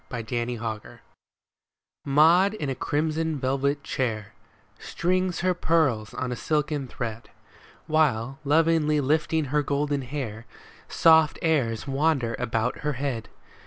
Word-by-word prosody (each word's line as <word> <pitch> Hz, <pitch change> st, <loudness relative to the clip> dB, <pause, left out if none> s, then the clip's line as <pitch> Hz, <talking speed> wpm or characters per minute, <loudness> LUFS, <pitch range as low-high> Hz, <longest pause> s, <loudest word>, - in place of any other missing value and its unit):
MAUD 115 Hz, -2 st, -6 dB
AND 120 Hz, 0 st, -2 dB
MADGE 110 Hz, -2 st, -6 dB, 1.1 s
Maud 165 Hz, +8 st, +5 dB
in 145 Hz, -9 st, -3 dB
a -, -, 0 dB
crimson 155 Hz, +3 st, -1 dB
velvet 140 Hz, +2 st, -1 dB
chair 110 Hz, -7 st, -3 dB, 0.5 s
Strings 185 Hz, +1 st, -1 dB
her 185 Hz, +1 st, +2 dB
pearls 155 Hz, -11 st, 0 dB
on 130 Hz, -1 st, -3 dB
a -, -, -2 dB
silken 150 Hz, 0 st, -1 dB
thread, 115 Hz, -2 st, -6 dB, 0.6 s
While, 135 Hz, -5 st, +1 dB
lovingly 155 Hz, 0 st, +3 dB
lifting 155 Hz, +2 st, +1 dB
her 150 Hz, -, +3 dB
golden 145 Hz, 0 st, -1 dB
hair, 125 Hz, -5 st, -6 dB, 0.4 s
Soft 160 Hz, -1 st, +5 dB
airs 135 Hz, -9 st, +1 dB
wander 135 Hz, -4 st, +1 dB
about 115 Hz, 0 st, -1 dB
her 150 Hz, 0 st, -2 dB
head. 130 Hz, -4 st, -4 dB
140 Hz, 125 wpm, -25 LUFS, 120-155 Hz, 1.1 s, Maud